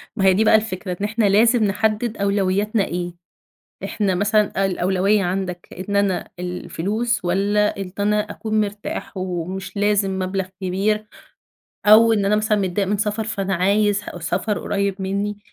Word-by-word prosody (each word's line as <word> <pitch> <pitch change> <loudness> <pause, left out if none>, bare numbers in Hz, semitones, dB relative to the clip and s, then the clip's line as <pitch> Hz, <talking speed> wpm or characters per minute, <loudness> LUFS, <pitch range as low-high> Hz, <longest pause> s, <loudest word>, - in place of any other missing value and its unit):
ما 195 -4 0
هي 190 - +6
دي 210 +4 +3
بقى 220 - +5
الفكرة، 185 -4 -1
إن 205 - +1
إحنا 220 +1 0
لازم 225 +4 +4
نحدد 215 +3 0
أولوياتنا 200 +1 +1
إيه. 175 0 -4 0.7
إحنا 200 -4 0
مثلًا 205 0 +2
الأولوية 195 +2 +1
عندك 180 -1 -3 0.2
إن 200 - 0
أنا 200 -2 0
الفلوس 190 +5 -2
والّا 205 +3 +1
إن 195 -2 -6
ت - - -7
أنا 210 +1 +1
أكُون 215 0 -1
مرتاح 205 -1 -4
ومش 185 +1 -4
لازم 200 -2 +1
مَبلغ 190 0 -2
كبير، 205 +3 0 0.8
أو 225 +2 +7
إن 205 -2 +1
أنا 210 +2 +3
مثلًا 215 0 +1
متضايق 195 0 0
من 205 - +1
سفر 210 +1 -1
فأنا 195 -3 -2
عايز 205 +3 +2 0.2
سفر 180 +6 -1
قُريب 200 -1 -2
مني؟ 200 +2 -2
200 Hz, 155 wpm, -21 LUFS, 190-210 Hz, 0.8 s, أو